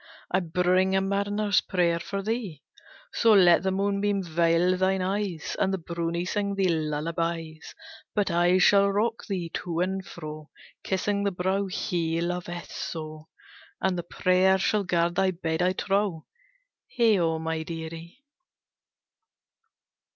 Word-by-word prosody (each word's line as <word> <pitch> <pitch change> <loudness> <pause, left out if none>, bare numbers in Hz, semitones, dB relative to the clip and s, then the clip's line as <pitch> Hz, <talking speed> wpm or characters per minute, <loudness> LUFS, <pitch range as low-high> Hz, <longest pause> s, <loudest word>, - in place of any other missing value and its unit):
I 185 - +3
bring 180 +2 +1
a - - +4
mariner's 200 +1 +1
prayer 170 -2 +1
for 195 +4 -4
thee; 210 - -4 0.5
So 230 -2 +4
let 175 -4 +6
the 190 - 0
moonbeam 200 +1 0
veil 170 +2 +2
thine 190 0 +1
eyes, 190 -4 -2
And 190 - +2
the 190 - 0
brownie 170 0 -3
sing 200 +1 -1
thee 195 -2 +2
lullabies; 160 +1 -3 0.4
But 205 -3 +1
I 175 +2 +3
shall 200 +2 +5
rock 220 +3 -1
thee 180 -5 -3
to 170 -2 -3
and 190 +1 -1
fro, 155 -3 -9 0.3
Kissing 200 +1 -1
the 200 - +2
brow 190 +2 -1
he 170 -4 -1
loveth 175 0 -4
so, 155 -1 -6 0.5
And 190 -1 0
the 175 - -2
prayer 185 +2 +2
shall 205 +2 +1
guard 170 -1 +1
thy 190 +1 +2
bed, 165 -2 -2
I 180 +1 +2
trow, 195 -4 -1 0.7
Heigho, 190 -9 +3
my 160 0 -3
dearie!" 165 - -8
180 Hz, 135 wpm, -26 LUFS, 165-195 Hz, 0.7 s, let